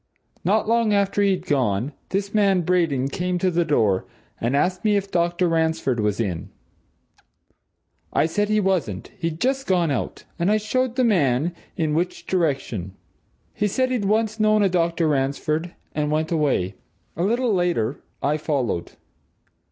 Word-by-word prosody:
Not 210 +5 +2
long 230 -2 +3
after 200 0 +1
he'd 190 -3 +1
gone, 130 - 0 0.2
this 195 +1 -2
man 200 -3 +3
Braden 160 -7 +1
came 180 +4 -1
to 185 +1 +1
the 175 0 +2
door, 110 - +1 0.3
and 120 +4 0
asked 180 +5 +1
me 210 -1 +3
if 200 0 -3
Dr. 175 +1 +1
Ransford 160 -6 +1
was 105 0 0
in? 95 -7 -2 1.6
I - - +2
said 205 +6 0
he 215 0 +3
wasn't 175 - -1
he'd 165 -1 -3
just 270 +3 0
gone 175 -5 +2
out, 130 - -3 0.2
and 170 +3 +2
I 215 - +4
showed 245 +3 -1
the 255 - +2
man 165 - +2 0.2
in 155 -3 0
which 175 +3 -1
direction. 135 - -1 0.6
He 210 - 0
said 255 +5 0
he'd 240 -6 0
once 215 +1 +1
known 215 -1 +4
a 195 - +3
Dr. 170 -2 +1
Ransford, 150 +4 -1 0.2
and 150 0 -1
went 155 +2 0
away. 140 - +1 0.4
A 165 - -3
little 235 +4 +1
later, 170 - 0 0.2
I 145 +2 +2
followed. 135 - -2
170 Hz, 160 wpm, -23 LUFS, 145-200 Hz, 1.6 s, I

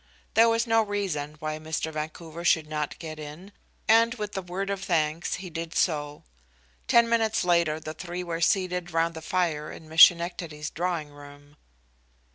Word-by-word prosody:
There 230 +1 +6
was 230 +1 +1
no 225 -1 +4
reason 190 -9 -3
why 155 0 -4
Mr. 160 0 -3
Vancouver 160 +2 -6
should 160 -2 +3
not 150 -1 -4
get 155 -2 -8
in, 155 +6 -9 0.4
and 230 +2 +5
with 210 -3 -5
a 195 - -1
word 190 +2 -4
of 195 -1 -3
thanks 160 -2 0
he 180 -1 -8
did 165 0 -5
so. 150 -3 0 0.6
Ten 235 0 +5
minutes 225 -4 +1
later 170 -3 +2
the 155 0 -7
three 180 +1 -6
were 170 -1 -4
seated 180 0 +1
round 165 0 +1
the 160 - -8
fire 160 -3 -1
in 160 - -11
Miss 160 +1 +3
Schenectady's 170 -3 +4
drawing 170 -3 -2
room. 145 0 -14
170 Hz, 170 wpm, -27 LUFS, 155-185 Hz, 0.6 s, There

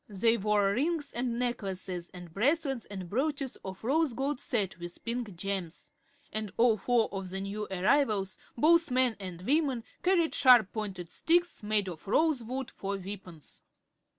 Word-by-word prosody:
They 225 +3 +3
wore 205 -2 +2
rings 295 +5 -1
and 240 -1 -1
necklaces 190 -7 -3
and 175 -2 -11
bracelets 270 - +1
and 190 -3 -6
brooches 275 - -1
of 190 +1 -9
rose 290 +3 +2
gold 270 +3 -2
set 200 -7 0
with 175 0 -9
pink 235 -4 -3
gems, 185 -2 -4 0.4
and 215 -2 -3
all 230 -1 +5
four 235 +2 +2
of 195 -2 -5
the 190 +1 -3
new 200 +2 -4
arrivals, 195 0 +1 0.2
both 330 +5 +5
men 255 -2 +2
and 180 -3 -7
women, 270 - +1 0.2
carried 360 -3 +2
sharp 245 -7 +6
pointed 195 -6 -5
sticks, 345 +1 +2
made 210 -2 +1
of 175 0 -8
rosewood, 265 -1 0
for 200 0 -4
weapons. 185 -4 -9
215 Hz, 150 wpm, -30 LUFS, 195-265 Hz, 0.4 s, sharp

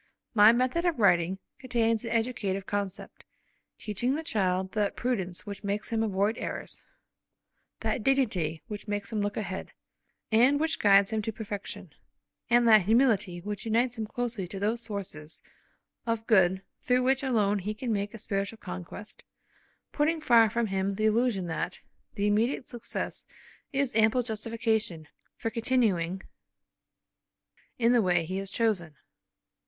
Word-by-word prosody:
My 210 -1 +8
method 255 +8 +1
of 345 -4 +1
writing 185 -3 +3 0.2
contains 230 -3 +1
an 230 - -4
educative 225 -5 -1
concept; 200 0 -4 0.5
teaching 240 +6 -1
the 320 - -3
child 190 - 0
that 210 -2 0
prudence 195 -8 -2
which 200 -1 -7
makes 200 +1 -2
him 225 -1 +1
avoid 205 +1 0
errors, - - -5 1.0
that - - -1
dignity 205 - +1
which 210 -1 -7
makes 205 +1 -3
him 215 -2 -1
look 205 +1 -2
ahead, 190 -3 -5 0.6
and 250 +6 +5
which 320 +1 0
guides 200 0 +5
him 220 - +1
to 225 - -3
perfection, 205 -4 -7 0.6
and 240 0 +5
that 215 -4 +7
humility 210 -6 +2
which 205 +2 -5
unites 235 +2 +1
him 220 -2 -4
closely 230 -5 -3
to 195 +2 -6
those 220 +4 0
sources 190 -9 -6 0.6
of 230 -1 -1
good 190 -4 +3 0.2
through 250 0 +2
which 265 +1 +2
alone 210 -6 +1
he 210 +3 -4
can 235 0 -2
make 205 +2 -2
a - - -6
spiritual 200 0 -3
conquest, 185 +2 -8 0.7
putting 315 +2 +1
far 235 -7 +5
from 235 +2 0
him 195 -1 -1
the 215 +2 0
illusion 220 -3 +2
that 175 +2 -3 0.4
the 200 - 0
immediate 225 +6 +1
success 240 -5 -5 0.4
is 275 -3 0
ample 225 +3 +3
justification 220 -6 -2 0.3
for 225 - -3
continuing 210 -7 +1 1.5
in 235 -1 +3
the 245 -2 +5
way 175 -4 +2
he 185 +3 -3
has 195 0 -3
chosen. 190 -9 0
215 Hz, 150 wpm, -28 LUFS, 195-235 Hz, 1.5 s, My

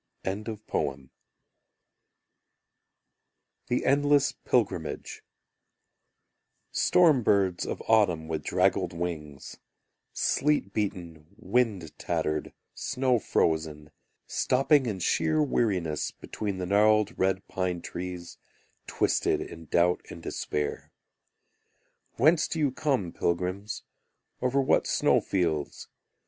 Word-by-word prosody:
The 95 - -4 2.7
Endless 145 0 +3
Pilgrimage 100 -10 -2 1.5
Storm 160 -7 +4
birds 95 -5 +1
of - - -4
autumn 90 -8 +3
With 80 -1 -3
draggled 90 -1 +1
wings: 80 -5 -5 0.5
Sleet 145 -9 +1
beaten, 85 -7 -4
wind 110 -8 0
tattered, 75 0 -2 0.2
snow 130 -2 0
frozen, 80 -5 -1 0.3
Stopping 135 +1 +2
in 105 -4 -2
sheer 155 - +1
weariness 95 - 0
Between 100 -3 -5
the 90 - -3
gnarled 105 +3 +3
red 95 0 0
pine 90 -2 -2
trees 90 0 -7 0.5
Twisted - - +1
in 80 0 -8
doubt 85 +3 +2
and - - -10
despair; 75 -1 -3 1.2
Whence 155 +6 +3
do - - -4
you 145 -4 +2
come, 130 - -1
pilgrims, 90 +4 -2 0.6
Over 130 +2 +1
what - - +2
snow - - +3
fields? 80 -6 -2
95 Hz, 90 wpm, -28 LUFS, 85-120 Hz, 2.7 s, Storm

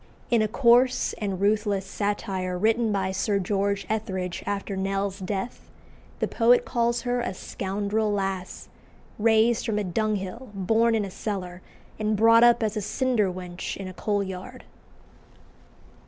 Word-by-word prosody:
In 235 -2 +4
a 215 - +2
coarse 250 +2 +3
and 195 -4 -2
ruthless 205 -1 +1
satire 195 -2 -2
written 225 +3 +2
by 190 -2 0
Sir 200 +2 0
George 200 +1 -1
Etherege 190 -5 -3
after 200 0 -2
Nell's 195 +1 -2
death, 195 +5 -5 0.5
the - - 0
poet 240 +1 +4
calls 235 -1 0
her 245 -1 0
a 215 - -3
"scoundrel 205 +3 -2
lass," 195 -2 -3 0.5
raised 225 +1 +3
from 220 -3 -1
a 210 - 0
dunghill, 210 +4 -2
born 225 +4 +2
in 215 -2 0
a 195 - -7
cellar, 185 -4 -5 0.4
and 215 0 0
brought 230 +2 +6
up 240 0 +5
as 215 0 -1
a 215 - -1
cinder 225 -2 +1
wench 180 -1 -6
in 195 - -6
a 185 - -7
coalyard. 200 +4 -3
205 Hz, 145 wpm, -26 LUFS, 190-230 Hz, 0.5 s, brought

